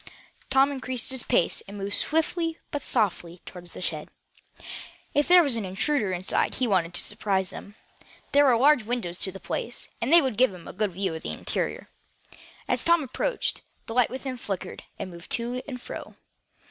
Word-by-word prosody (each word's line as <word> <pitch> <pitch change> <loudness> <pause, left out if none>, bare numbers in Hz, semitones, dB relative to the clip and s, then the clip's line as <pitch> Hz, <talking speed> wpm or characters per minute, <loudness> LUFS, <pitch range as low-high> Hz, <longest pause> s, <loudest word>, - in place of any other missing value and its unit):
Tom 270 +1 +4
increased 260 -2 -3
his 260 -2 +1
pace, 170 - +2
and 200 +1 -8
moved 200 0 -3
swiftly 325 - +1
but 290 - -2
softly 185 -8 0
toward 175 -1 -10
the 175 - -7
shed. 155 -3 -2 1.0
If 290 0 +2
there 355 0 +8
was 275 -6 0
an 225 - -2
intruder 200 +4 +1
inside 185 +1 0
he 255 - +1
wanted 180 -4 +1
to - - +2
surprise 195 -3 -1
him. 205 - -10 0.6
There 285 +1 +6
were 250 -4 +5
large 275 +1 +5
windows 215 -6 -3
to 190 - +2
the 195 - -9
place, 240 +6 -4
and 235 +5 0
they 340 - +10
would 260 -6 -1
give 250 -6 +4
a 175 - -10
good 210 -3 -1
view 190 -1 -1
of 160 - -5
the - - -5
interior. - - -2 0.8
As - - +2
Tom 335 -2 +4
approached, 275 - -2 0.2
the 225 - -6
light 250 -1 +4
within 260 0 -5
flickered, 195 -6 -5 0.2
and 185 - -5
moved 170 0 -11
to 245 +2 0
and 255 -3 -5
fro. - - -8
230 Hz, 185 wpm, -26 LUFS, 190-270 Hz, 1.0 s, they